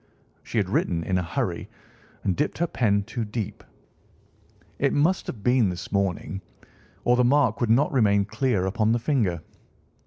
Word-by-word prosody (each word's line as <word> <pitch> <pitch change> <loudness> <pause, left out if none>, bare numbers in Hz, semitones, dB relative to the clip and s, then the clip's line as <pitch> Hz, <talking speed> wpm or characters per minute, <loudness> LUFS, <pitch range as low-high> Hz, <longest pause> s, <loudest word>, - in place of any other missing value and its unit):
She - - -5
had - - +2
written 85 -1 0
in 90 +1 0
a - - -1
hurry 85 - -3 0.5
and 95 -3 +1
dipped 150 - -1
her 170 - +1
pen 105 -10 +1
too 115 +2 -4
deep. 105 -1 -5 1.2
It - - +2
must 165 +6 +2
have 105 -5 -6
been 125 -4 +3
this 90 +1 -6
morning, 100 0 -1 0.6
or 120 - +4
the 125 - +3
mark 140 +2 +3
would 120 - +1
not 135 +7 +3
remain 100 -5 +3
clear 105 -3 0
upon 110 +3 +1
the - - +2
finger. 110 - 0
110 Hz, 165 wpm, -25 LUFS, 100-125 Hz, 1.2 s, or